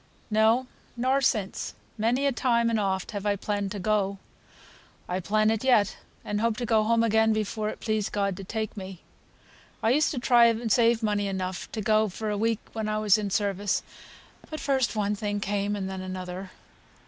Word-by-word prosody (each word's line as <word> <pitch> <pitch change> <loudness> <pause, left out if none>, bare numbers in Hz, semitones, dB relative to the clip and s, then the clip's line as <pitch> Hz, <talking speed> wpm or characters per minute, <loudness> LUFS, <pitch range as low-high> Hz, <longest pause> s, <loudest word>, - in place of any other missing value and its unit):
"No, 220 +4 +4 0.3
nor 260 +3 +2
since. 215 -7 -1 0.2
Many 235 +5 +1
a 280 - +3
time 235 -2 +1
and 225 - +1
oft 190 -2 -1
have 205 -2 -4
I 205 -1 +1
planned 200 0 -2
to - - -4
go. 200 0 0 0.9
I 180 +1 -1
plan 215 +3 +2
it 225 +1 -1
yet, 230 -7 +3 0.3
and 210 0 -2
hope 230 -1 +1
to 245 - -2
go 220 -1 +3
home 230 +1 +3
again 220 0 +3
before 215 0 -2
it - - -7
please 215 -2 -1
God 200 -2 -1
to 195 - -7
take 220 +2 -4
me. 190 -3 -8 0.8
I 225 - +4
used 300 +4 +3
to 260 - -3
try 240 -1 +5
and 230 0 0
save 230 0 +4
money 205 -1 +1
enough 190 -1 -4
to 220 - -2
go 215 +1 +3
for 215 +3 -4
a - - -1
week 225 +1 0
when 220 -1 -2
I 215 - 0
was 215 -1 +4
in 205 -1 -2
service; 200 0 0 0.7
but 310 - -5
first 265 -4 0
one 210 -1 0
thing 205 0 -2
came, 205 0 -1
and 195 -2 -3
then 190 0 -5
another. 185 0 -6
215 Hz, 195 wpm, -27 LUFS, 200-230 Hz, 0.9 s, try